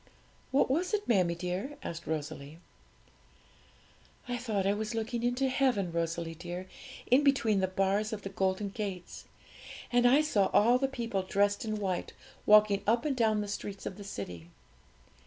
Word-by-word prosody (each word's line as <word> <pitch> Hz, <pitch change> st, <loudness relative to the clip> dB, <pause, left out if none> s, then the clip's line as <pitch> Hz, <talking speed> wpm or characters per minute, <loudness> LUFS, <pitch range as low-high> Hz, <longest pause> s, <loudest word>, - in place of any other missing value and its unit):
'What 270 Hz, -1 st, +2 dB
was 360 Hz, +8 st, +1 dB
it, 415 Hz, -, -4 dB
mammie 185 Hz, -7 st, +3 dB
dear?' 180 Hz, +11 st, -4 dB
asked 170 Hz, -1 st, -6 dB
Rosalie. 155 Hz, -1 st, -5 dB, 1.7 s
'I 245 Hz, 0 st, -2 dB
thought 220 Hz, -5 st, -1 dB
I 200 Hz, -, +3 dB
was 215 Hz, +2 st, -3 dB
looking 230 Hz, +1 st, -2 dB
into 245 Hz, +3 st, +1 dB
heaven, 255 Hz, -9 st, +1 dB
Rosalie 165 Hz, 0 st, -2 dB
dear, 175 Hz, +2 st, -7 dB, 0.4 s
in 265 Hz, +4 st, +6 dB
between 235 Hz, -8 st, +3 dB
the 190 Hz, -, +1 dB
bars 195 Hz, +3 st, 0 dB
of 210 Hz, -2 st, -5 dB
the 195 Hz, -, -4 dB
golden 195 Hz, +1 st, -1 dB
gates; 195 Hz, -3 st, -6 dB, 0.7 s
and 245 Hz, 0 st, +4 dB
I 270 Hz, +5 st, +6 dB
saw 210 Hz, -11 st, +2 dB
all 240 Hz, +4 st, +5 dB
the 270 Hz, -, +1 dB
people 235 Hz, -7 st, -2 dB
dressed 200 Hz, +3 st, +1 dB
in 215 Hz, -1 st, -2 dB
white 190 Hz, -4 st, -3 dB, 0.3 s
walking 210 Hz, -1 st, +6 dB
up 230 Hz, +4 st, +2 dB
and 290 Hz, -3 st, 0 dB
down 220 Hz, -3 st, +2 dB
the 205 Hz, -, -4 dB
streets 200 Hz, -1 st, -6 dB
of 185 Hz, -, -5 dB
the 205 Hz, -, -8 dB
city. 90 Hz, -, -7 dB
205 Hz, 165 wpm, -30 LUFS, 185-240 Hz, 1.7 s, in